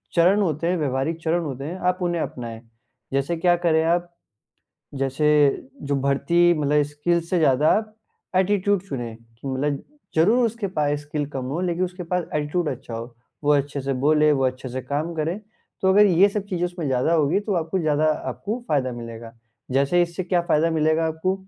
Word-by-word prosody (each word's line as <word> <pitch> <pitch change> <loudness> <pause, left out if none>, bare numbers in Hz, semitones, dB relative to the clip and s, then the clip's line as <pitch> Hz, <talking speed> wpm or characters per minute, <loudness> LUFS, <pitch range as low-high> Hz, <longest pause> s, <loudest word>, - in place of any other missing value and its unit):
चरण 185 +4 +4
होते 165 -3 0
हैं, 180 +1 +1
व्यावहारिक 145 +2 -1
चरण 170 +1 +1
होते 135 -3 -5
हैं 170 +5 -5
आप 180 - -1
उन्हें 175 -2 0
अपनाएँ। 115 -5 -6 0.5
जैसे 140 +5 0
क्या 175 +1 +3
करें 160 -1 +4
आप, 175 +1 +1 0.9
जैसे 135 +2 0 0.5
जो 140 0 -1
भर्ती 155 +6 +3
मतलब 150 -1 +2
स्किल्स 165 +3 -1
से 180 - +2
ज़्यादा 150 -1 +3
आप 215 -1 -7 0.4
एटीट्यूड 195 0 +2
चुने, 120 -4 -4
कि 115 +3 -12
मतलब 140 +2 -1 0.3
ज़रूर 220 +10 +4
उसके 230 -2 -3
पास 145 -1 +1
स्किल 145 0 -3
कम 135 -3 -4
हो 170 - -1
लेकिन 180 0 0
उसके 180 0 -6
पास 180 -1 +1
एटीट्यूड 150 +3 0
अच्छा 125 -3 -6
हो, 115 +1 -7 0.3
वो 145 - +4
अच्छे 140 0 -1
से 135 +1 -2
बोले, 150 +3 +3
वो 135 -2 +1
अच्छे 130 0 -4
से 130 +1 -5
काम 145 +6 -2
करे, 165 +5 -2 0.4
तो 190 - +3
अगर 210 +2 +6
ये 190 +1 +5
सब 205 0 -3
चीज़ 180 -3 -2
उसमें 175 -3 -4
ज़्यादा 130 +4 +1
होगी, 160 +4 +2
तो 205 -1 -2
आपको 165 +2 -1
ज़्यादा 155 -3 +1 0.2
आपको 230 +4 -4
फायदा 130 -4 +1
मिलेगा। 115 -1 -8 0.4
जैसे 140 +7 +2
इससे 170 +1 -3
क्या 180 0 +1
फायदा 165 +1 +3
मिलेगा 160 0 +2
आपको, 160 +4 -1
155 Hz, 185 wpm, -23 LUFS, 140-175 Hz, 0.9 s, अगर